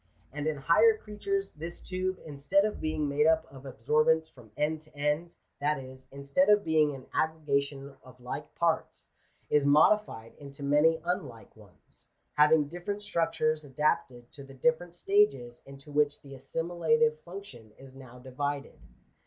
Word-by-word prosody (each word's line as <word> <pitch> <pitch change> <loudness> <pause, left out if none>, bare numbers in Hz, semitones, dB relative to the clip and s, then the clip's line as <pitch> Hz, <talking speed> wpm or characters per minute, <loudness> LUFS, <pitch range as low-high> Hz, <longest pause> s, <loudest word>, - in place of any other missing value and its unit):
And 150 +1 -3
in 155 -2 -1
higher 210 +11 +4
creatures, 390 - -3
this 165 +3 -8
tube, 185 0 -3
instead 155 +7 +1
of 215 - -3
being 155 -1 -1
made 145 +2 +2
up 160 0 +3
of 135 0 -11
absorbents 155 +6 +2
from 125 -7 -17
end 150 +1 -1
to 155 -2 -17
end 150 +4 -1
— - - -49
that 150 +1 +1
is, 130 0 -11
instead 140 +8 +1
of 210 0 +5
being 155 -2 +2
an 130 - -11
aggregation 140 -3 -1
of 130 -1 -17
like 125 0 -7
parts - - -1 0.2
— - - -40
is 150 -1 +4
modified 145 - +3
into 140 0 -10
many 150 +3 +3
unlike 120 - -4
ones, 100 -8 -13 0.2
having 150 0 +4
different 175 +6 -5
structures 155 -4 0
adapted 130 -4 -1
to 140 - -11
the 135 0 -13
different 160 +5 0
stages 175 -12 +1
into 140 +2 -12
which 145 0 +1
the 140 -1 -11
assimilative 175 - 0
function 170 - -11
is 135 -1 -14
now 130 -2 -13
divided. 140 +3 -5
150 Hz, 160 wpm, -29 LUFS, 135-170 Hz, 0.2 s, of